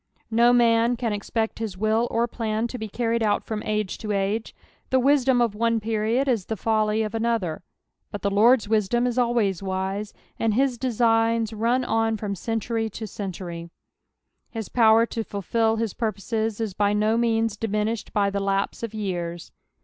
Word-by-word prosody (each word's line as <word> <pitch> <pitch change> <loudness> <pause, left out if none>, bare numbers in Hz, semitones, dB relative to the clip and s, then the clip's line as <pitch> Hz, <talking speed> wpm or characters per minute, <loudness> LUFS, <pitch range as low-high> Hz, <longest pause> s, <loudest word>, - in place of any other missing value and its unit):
No 235 +2 +5
man 235 0 +4
can 230 -3 -1
expect 220 +2 -2
his 215 -5 -4
wilt 220 +3 +1
or 235 +1 +1
plan 220 -1 -2
to 250 - -6
be 220 - -4
carried 230 +2 -1
oat 210 -2 +1
from 215 -1 -4
ago 215 0 0
to 210 +2 -6
age; 205 +3 -1 0.3
the 260 - +3
wisdom 260 -2 +3
of 230 -3 0
one 230 +1 +1
period 225 +4 0
is 230 -8 0
the 220 - -3
folly 215 +1 +1
of 215 0 -4
another, 225 -7 -1 0.5
bnt 205 - -6
the 200 - 0
Lord's 225 +3 +4
wisdom 220 +3 +1
is 250 0 0
always 230 -7 +1
wise, 195 +2 -3 0.3
and 225 -2 +1
his 260 -1 +1
designs 230 -2 +2
run 235 +4 +1
on 225 0 +1
from 205 -1 -3
century 225 +3 -2
to 220 +1 -6
century. 180 -4 -6 0.9
Uis 225 -2 -5
power 225 -1 +5
to 230 -1 -4
fulfil 220 +3 0
his 225 -3 -2
purposes 220 0 -2
is 220 -4 -2
by 205 +1 +1
no 215 +2 +2
means 225 -2 +1
diminished 215 +1 -2
by 200 -1 +1
the 200 - -1
lapae 195 0 -1
of 230 -2 -5
years. 175 -5 -4
220 Hz, 175 wpm, -24 LUFS, 205-230 Hz, 0.9 s, No